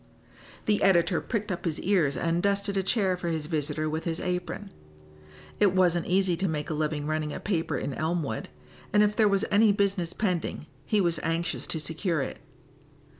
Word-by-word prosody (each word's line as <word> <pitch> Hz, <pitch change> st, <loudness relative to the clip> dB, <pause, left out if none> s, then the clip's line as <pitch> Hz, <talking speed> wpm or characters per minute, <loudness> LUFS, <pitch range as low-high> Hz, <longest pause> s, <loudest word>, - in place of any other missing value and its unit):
The 210 Hz, -1 st, +2 dB
editor 180 Hz, -3 st, +3 dB
pricked 215 Hz, -3 st, -3 dB
up 175 Hz, -1 st, -4 dB
his 165 Hz, -3 st, -1 dB
ears 170 Hz, -9 st, +2 dB
and 170 Hz, +1 st, 0 dB
dusted 200 Hz, 0 st, 0 dB
a 195 Hz, -, +2 dB
chair 190 Hz, -1 st, +1 dB
for 180 Hz, -1 st, -5 dB
his 160 Hz, -2 st, -1 dB
visitor 155 Hz, -1 st, -1 dB
with 155 Hz, +1 st, -3 dB
his 165 Hz, -1 st, -2 dB
apron. 180 Hz, +2 st, -3 dB, 0.9 s
It 195 Hz, -3 st, +4 dB
wasn't 175 Hz, -2 st, +3 dB
easy 185 Hz, -1 st, +3 dB
to 190 Hz, +2 st, 0 dB
make 155 Hz, 0 st, -2 dB
a -, -, 0 dB
living 150 Hz, -1 st, -1 dB
running 155 Hz, 0 st, -1 dB
a -, -, -5 dB
paper 165 Hz, -7 st, -1 dB
in 140 Hz, -, -3 dB
Elmwood, 155 Hz, -6 st, -2 dB, 0.4 s
and 210 Hz, 0 st, +6 dB
if 210 Hz, 0 st, +1 dB
there 215 Hz, -1 st, +4 dB
was 195 Hz, -1 st, +2 dB
any 210 Hz, +1 st, +5 dB
business 195 Hz, -4 st, 0 dB
pending 180 Hz, -7 st, -2 dB, 0.2 s
he 210 Hz, -2 st, +3 dB
was 170 Hz, -3 st, +1 dB
anxious 165 Hz, +1 st, -1 dB
to 160 Hz, -, -2 dB
secure 160 Hz, +2 st, -1 dB
it. -, -, -6 dB
175 Hz, 185 wpm, -27 LUFS, 160-200 Hz, 0.9 s, and